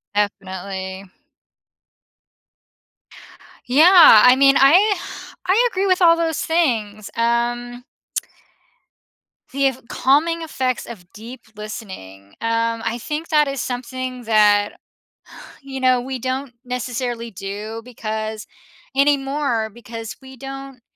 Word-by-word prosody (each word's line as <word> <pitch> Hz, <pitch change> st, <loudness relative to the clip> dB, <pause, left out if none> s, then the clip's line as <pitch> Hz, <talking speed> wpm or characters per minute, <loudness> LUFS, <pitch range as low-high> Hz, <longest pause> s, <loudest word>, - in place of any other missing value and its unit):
Definitely. 190 Hz, -1 st, -3 dB, 2.6 s
Yeah, 310 Hz, -, +8 dB
I 250 Hz, +1 st, +7 dB
mean, 275 Hz, 0 st, +5 dB
I 370 Hz, +10 st, +5 dB, 0.5 s
I 450 Hz, +7 st, +4 dB
agree 385 Hz, +1 st, -1 dB
with 370 Hz, 0 st, +2 dB
all 335 Hz, -1 st, +7 dB
those 325 Hz, -2 st, -1 dB
things, 225 Hz, -11 st, -1 dB
um 240 Hz, +1 st, -1 dB, 1.7 s
The 275 Hz, +1 st, 0 dB
ef 260 Hz, -1 st, -3 dB
calming 325 Hz, +5 st, +1 dB
effects 260 Hz, -6 st, -2 dB
of 190 Hz, -6 st, -11 dB
deep 235 Hz, +4 st, -11 dB
listening. 145 Hz, -, -9 dB
Um, 230 Hz, 0 st, 0 dB
I 235 Hz, -, -2 dB
think 305 Hz, +6 st, -5 dB
that 300 Hz, -2 st, +3 dB
is 275 Hz, -2 st, -3 dB
something 255 Hz, 0 st, -5 dB
that, 210 Hz, -2 st, +3 dB, 0.9 s
you 270 Hz, -1 st, -7 dB
know, 255 Hz, -1 st, +3 dB
we 260 Hz, +1 st, -5 dB
don't 260 Hz, +1 st, -4 dB
necessarily 245 Hz, -1 st, -4 dB
do 205 Hz, +4 st, -6 dB
because 220 Hz, -2 st, -5 dB, 0.5 s
anymore, 275 Hz, -5 st, +1 dB
because 225 Hz, 0 st, -8 dB
we 265 Hz, -1 st, -13 dB
don't 270 Hz, -1 st, -9 dB
245 Hz, 105 wpm, -20 LUFS, 220-275 Hz, 2.6 s, Yeah